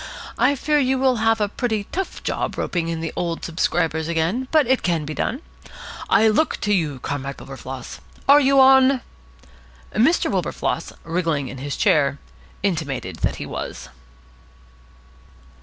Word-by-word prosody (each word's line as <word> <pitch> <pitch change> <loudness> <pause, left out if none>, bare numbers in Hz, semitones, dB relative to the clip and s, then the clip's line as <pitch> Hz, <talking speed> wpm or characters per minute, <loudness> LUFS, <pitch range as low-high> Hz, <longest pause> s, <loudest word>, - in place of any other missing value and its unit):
I 285 - +4
fear 300 +2 +1
you 265 -1 +2
will 260 -1 +2
have 225 0 +2
a 210 - +1
pretty 220 0 -2
tough 385 0 -4
job - - -2
roping 170 -2 -1
in 165 -1 -3
the 165 - -4
old 170 -1 -3
subscribers 160 -1 0
again, 170 +10 -1
but 310 -3 +4
it 260 +1 +2
can 165 -4 0
be 155 - -5
done. 255 - -2 0.7
I 220 - +5
look 220 +9 +2
to 205 - +1
you, 155 -8 0
Comrade 140 +1 -4
Wilberfloss. 135 -1 -8 0.3
Are 285 +1 +8
you 275 -1 +4
on?" 265 0 +6 0.9
Mr. 265 - +3
Wilberfloss, - - -2
wriggling 165 -5 -1
in 130 - -8
his 140 +1 -4
chair, 145 -8 +3 0.5
intimated 160 -9 -2
that - - -1
he - - -6
was. - - -6
180 Hz, 150 wpm, -22 LUFS, 155-260 Hz, 0.9 s, Are